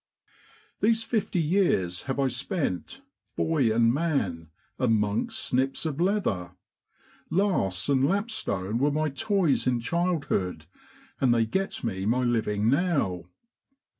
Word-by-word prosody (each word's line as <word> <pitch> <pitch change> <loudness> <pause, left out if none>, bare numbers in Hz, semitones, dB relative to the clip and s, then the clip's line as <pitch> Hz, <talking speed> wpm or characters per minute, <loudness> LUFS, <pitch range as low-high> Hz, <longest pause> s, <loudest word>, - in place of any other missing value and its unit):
* 435 -1 -30
These 225 +1 +3
fifty 220 -5 -1
years 150 - +1
have 130 - -1
I 135 - +3
spent, 135 - -3 0.3
boy 145 -8 +1
and 115 +1 +3
man, 115 - -1 0.3
amongst 115 - +1
snips 135 +4 0
of 155 0 -2
leather; 115 - 0 0.8
lasts 170 - +1
and 135 -1 +3
lapstone 120 - -1
were 140 +3 +3
my 155 +1 0
toys 165 0 +1
in 125 -1 +2
childhood, 140 - -1 0.5
and 130 -3 +3
they 115 -1 +3
get 190 +13 -2
me 95 -4 -2
my 125 +3 +2
living 110 -3 0
now. 135 - +1
135 Hz, 125 wpm, -27 LUFS, 105-175 Hz, 0.8 s, These